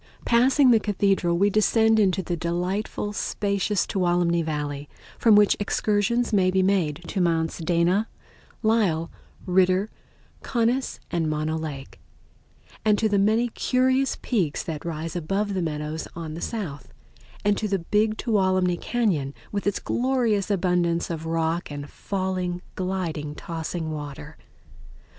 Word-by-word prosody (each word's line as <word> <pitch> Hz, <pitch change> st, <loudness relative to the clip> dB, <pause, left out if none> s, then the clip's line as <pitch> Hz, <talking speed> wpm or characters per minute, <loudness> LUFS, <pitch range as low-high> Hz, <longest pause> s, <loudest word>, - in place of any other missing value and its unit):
Passing 255 Hz, +3 st, +5 dB
the 225 Hz, -, +6 dB
Cathedral 195 Hz, -4 st, +1 dB
we 200 Hz, +3 st, +3 dB
descend 220 Hz, +1 st, +3 dB
into 190 Hz, -2 st, +2 dB
the 175 Hz, +1 st, -2 dB
delightful, 180 Hz, +5 st, -2 dB
spacious 200 Hz, -1 st, 0 dB
Tuolumne 175 Hz, -2 st, +1 dB
Valley, 150 Hz, -2 st, -4 dB, 0.3 s
from 225 Hz, -3 st, +6 dB
which 205 Hz, -1 st, +5 dB
excursions 215 Hz, +3 st, 0 dB
may 190 Hz, -3 st, +4 dB
be 190 Hz, 0 st, +2 dB
made 180 Hz, -5 st, +1 dB
to 195 Hz, -, -1 dB
Mounts 165 Hz, -1 st, 0 dB
Dana, 175 Hz, +5 st, +2 dB, 0.6 s
Lyell, 200 Hz, -8 st, +2 dB, 0.3 s
Ritter, 185 Hz, +2 st, +2 dB, 0.5 s
Conness, 245 Hz, +2 st, 0 dB
and 165 Hz, -2 st, 0 dB
Mono 155 Hz, +1 st, -1 dB
Lake, 150 Hz, -4 st, -6 dB, 0.8 s
and 210 Hz, -1 st, +3 dB
to 220 Hz, -, +2 dB
the 205 Hz, -2 st, +2 dB
many 220 Hz, +4 st, +2 dB
curious 260 Hz, +3 st, +1 dB
peaks 185 Hz, -, 0 dB
that 160 Hz, -2 st, -5 dB
rise 165 Hz, 0 st, -4 dB
above 195 Hz, +5 st, -1 dB
the 185 Hz, -, -1 dB
meadows 155 Hz, -1 st, -3 dB
on 165 Hz, -2 st, -6 dB
the 165 Hz, -, -7 dB
south, 145 Hz, -, -5 dB, 0.5 s
and 205 Hz, 0 st, +4 dB
to 215 Hz, -, -1 dB
the 195 Hz, -1 st, +1 dB
Big 210 Hz, +5 st, +1 dB
Tuolumne 185 Hz, -5 st, +1 dB
Cañon, 180 Hz, -, 0 dB, 0.2 s
with 200 Hz, -1 st, -2 dB
its 205 Hz, -, +1 dB
glorious 240 Hz, -6 st, 0 dB
abundance 175 Hz, -3 st, +1 dB
of 165 Hz, -1 st, -4 dB
rock 165 Hz, +1 st, -1 dB
and 145 Hz, -1 st, -6 dB
falling, 185 Hz, 0 st, -3 dB
gliding, 170 Hz, -6 st, -3 dB
tossing 160 Hz, 0 st, -4 dB
water. 145 Hz, 0 st, -7 dB
185 Hz, 135 wpm, -25 LUFS, 165-210 Hz, 0.8 s, the